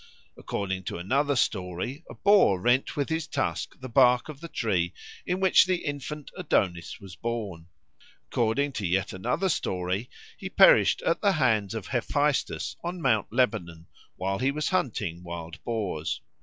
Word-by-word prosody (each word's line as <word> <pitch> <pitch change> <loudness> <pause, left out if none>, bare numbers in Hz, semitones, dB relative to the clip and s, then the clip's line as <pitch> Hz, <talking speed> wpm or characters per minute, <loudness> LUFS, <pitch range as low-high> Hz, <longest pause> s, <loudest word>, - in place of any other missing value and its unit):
According 95 -2 -3
to - - -4
another 140 +11 +1
story, 95 - -1
a - - -9
boar 200 - +4
rent 120 - +2
with 140 +1 0
his 160 0 -1
tusk 135 - -3
the 130 - -6
bark 125 +2 +4
of 145 -3 -8
the 170 - -6
tree 95 - -1 0.3
in 180 +1 0
which 190 -1 +5
the 185 -2 -1
infant 145 +1 -5
Adonis 95 - -1
was 95 -2 -11
born. 105 -8 -4 0.6
According 120 +5 +1
to 105 -8 -3
yet 95 +3 0
another 95 - -1
story, 95 - -1 0.3
he - - -5
perished - - +6
at - - +1
the 200 -2 +3
hands 115 - +1
of 110 -4 -4
Hephaestus 145 +3 0
on 175 +1 -4
Mount 115 -9 +2
Lebanon 85 -9 0 0.3
while 95 +1 -2
he 130 +2 +2
was 150 +2 -1
hunting 105 - -1
wild 85 -2 -8
boars. 100 -9 -2
120 Hz, 155 wpm, -27 LUFS, 95-145 Hz, 0.6 s, perished